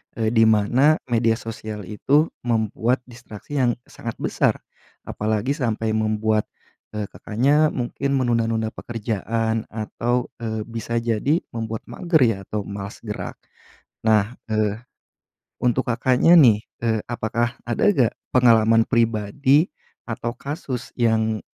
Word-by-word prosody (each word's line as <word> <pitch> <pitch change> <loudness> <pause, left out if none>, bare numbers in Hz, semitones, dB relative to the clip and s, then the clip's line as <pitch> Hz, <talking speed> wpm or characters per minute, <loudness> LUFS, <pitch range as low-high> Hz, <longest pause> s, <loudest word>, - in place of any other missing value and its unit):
eee, 110 -1 0
di 115 -1 +4
mana 120 +8 +4
media 115 -1 +3
sosial 110 -2 -6
itu 145 +9 +2 0.2
membuat 115 +2 0
distraksi 120 +3 -8
yang 125 -3 +3 0.2
sangat 115 -1 -6
besar, - - +1 0.5
apalagi 110 +6 -1
sampai 115 -5 -1
membuat, 110 0 +1 0.5
eee, 105 -1 -4
Kakaknya 145 +8 +1
mungkin 130 +3 -2
menunda-nunda 115 -3 +1
pekerjaan 115 0 -2
atau, 120 +3 -2
eee, 110 -2 -3
bisa 115 0 -3
jadi 120 +8 +1
membuat 115 -1 -4
mager 170 -5 +1
ya 115 -5 +4
atau 105 -1 -2
malas 100 0 -7
gerak. 105 -2 -5 0.7
Nah, 110 0 +3 0.2
eh, 110 -1 0 0.9
untuk 125 +1 +1
Kakaknya, 130 +8 +4
nih, 115 -9 +6 0.2
eee, 110 -1 +1
apakah 120 +1 -1
ada 120 - -2
nggak 125 - +2 0.2
pengalaman 115 -2 +5
pribadi 120 - +2 0.3
atau 120 +1 -4
kasus 140 -4 -5
yang, 110 -2 +1
115 Hz, 120 wpm, -22 LUFS, 110-125 Hz, 0.9 s, nih